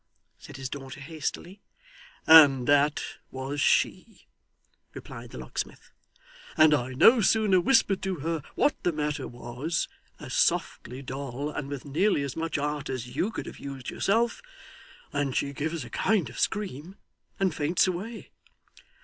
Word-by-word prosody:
said - - -11
his 135 -1 -4
daughter 135 +1 -8
hastily. 160 +6 -5 0.6
'And 145 -6 +8
that 145 +1 +3 0.3
was 135 +2 -4
she,' - - +1 0.7
replied - - -9
the - - -10
locksmith; 65 -1 -6 0.7
'and 155 -1 +7
I 130 -2 0
no 225 - +6
sooner 205 -3 +3
whispered 205 -3 +3
to 190 -1 -2
her 165 +1 -3
what 295 - +3
the 175 - +1
matter 150 -1 -2
was 125 +7 -3 0.3
as - - -8
softly, 130 +2 0
Doll, 135 +2 -5
and 145 -2 -5
with 140 -1 -6
nearly 155 +3 +1
as 140 -2 -4
much 165 -1 -2
art 145 0 -3
as 125 -2 -5
you 195 - +1
could - - -6
have - - -9
used 135 -3 -7
yourself 230 +4 +1 0.7
than 145 -3 -1
she 140 +2 -1
gives 155 0 -3
a - - -10
kind 185 - +1
of - - -9
scream 190 -3 -2 0.4
and 190 -3 +1
faints 155 +3 +2
away. 195 +6 -5
150 Hz, 150 wpm, -27 LUFS, 135-180 Hz, 0.7 s, And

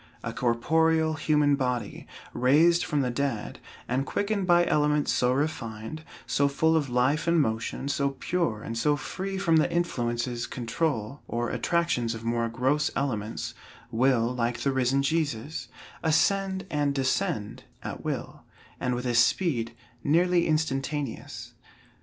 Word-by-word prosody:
A - - -4
corporeal, 160 +7 +2
human 150 -1 +2
body, 125 -3 -3 0.3
raised 160 +7 +4
from 145 -1 0
the 125 -2 0
dead, 125 -4 -2 0.3
and 130 +2 0
quickened 200 +4 -1
by 175 -1 +5
elements 150 -1 +2
so 125 0 +2
refined, 135 -1 -3 0.2
so 130 +4 +2
full 160 +3 +2
of 150 -4 +1
life 130 +7 +1
and 170 0 +4
motion, 115 +1 -1
so 140 0 +1
pure, 170 -12 -1
and 115 - -5
so 145 +6 +2
free 190 +6 -4
from 170 -4 +3
the 160 +2 +2
influences 120 -7 -1
control, 125 0 -2
or 120 0 -2
attractions 125 -3 0
of 115 - -8
more 115 0 0
gross 130 +6 +1
elements, 115 -6 -2 0.4
will, 120 0 +2
like 120 -1 -1
the 140 - +1
risen 130 +1 +1
Jesus, 145 -4 -1 0.3
ascend 190 +4 +1
and 145 -2 0
descend 135 - -1 0.2
at - - -6
will, - - -4 0.4
and 125 0 0
with 125 +1 -4
a 120 - 0
speed 120 -1 +2 0.3
nearly 175 +3 +3
instantaneous. 145 -3 -2
140 Hz, 140 wpm, -27 LUFS, 120-160 Hz, 0.4 s, by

